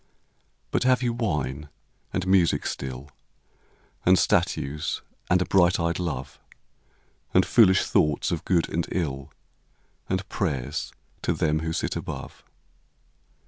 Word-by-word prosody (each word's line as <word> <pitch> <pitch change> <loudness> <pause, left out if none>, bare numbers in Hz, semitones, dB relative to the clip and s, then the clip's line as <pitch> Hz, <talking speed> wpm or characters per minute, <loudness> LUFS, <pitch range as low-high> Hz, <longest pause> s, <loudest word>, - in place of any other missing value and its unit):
But - - +1
have 130 0 +3
you 120 -1 +1
wine 75 - -2 0.4
and 95 - -2
music 95 -3 +3
still, 65 +2 -5 0.9
And 95 +1 +5
statues 75 -3 0 0.3
and 90 - +4
a - - -7
bright 90 -2 +3
eyed 85 +1 0
love, 70 -7 -4 1.0
And 95 - +6
foolish 95 -6 +5
thoughts 75 +3 +1
of 85 - -2
good 85 -3 +2
and 85 0 -2
ill, 70 -7 -3 0.8
And 95 +1 -1
prayers 70 -14 -2 0.3
to - - 0
them 75 0 +1
who 80 0 -3
sit - - -2
above - - -6
85 Hz, 125 wpm, -26 LUFS, 75-95 Hz, 1.0 s, And